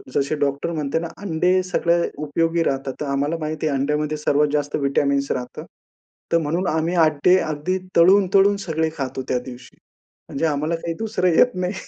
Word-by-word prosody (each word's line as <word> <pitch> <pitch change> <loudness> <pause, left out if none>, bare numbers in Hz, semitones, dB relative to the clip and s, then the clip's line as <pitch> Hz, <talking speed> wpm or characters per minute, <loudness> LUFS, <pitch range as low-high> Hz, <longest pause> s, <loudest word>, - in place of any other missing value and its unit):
जसे 140 +2 +1
डॉक्टर 140 +3 -1
म्हणते 150 -1 -2
ना, 170 - -4
अंडे 185 0 +1
सगळे 175 -1 +1 0.2
उपयोगी 165 +3 0
राहतात. 135 -2 -2
तर - - -1
आम्हाला 140 +3 -1
माहिती 155 0 -2
आहे 140 -2 0
अंड्यामध्ये 150 +2 -1
सर्वात 150 0 +2
जास्त 145 -1 -1
व्हिटॅमिन्स 140 0 0
राहतात. 125 0 -5 0.7
तर 170 - +4
म्हणून 165 +4 -1
आम्ही 160 +2 0
अड्डे 155 +4 +3
अगदी 155 +3 -2 0.2
तळून-तळून 195 +3 +5
सगळे 160 -1 0
खातो 135 -2 -4
त्या 125 - 0
दिवशी. 125 -1 -11 0.5
म्हणजे 140 - -2
आम्हाला 155 +2 0
काही 165 0 -4
दुसरं 220 -4 -1
येत 250 - +4
नाही 180 +1 -1
155 Hz, 165 wpm, -21 LUFS, 140-170 Hz, 0.7 s, तळून-तळून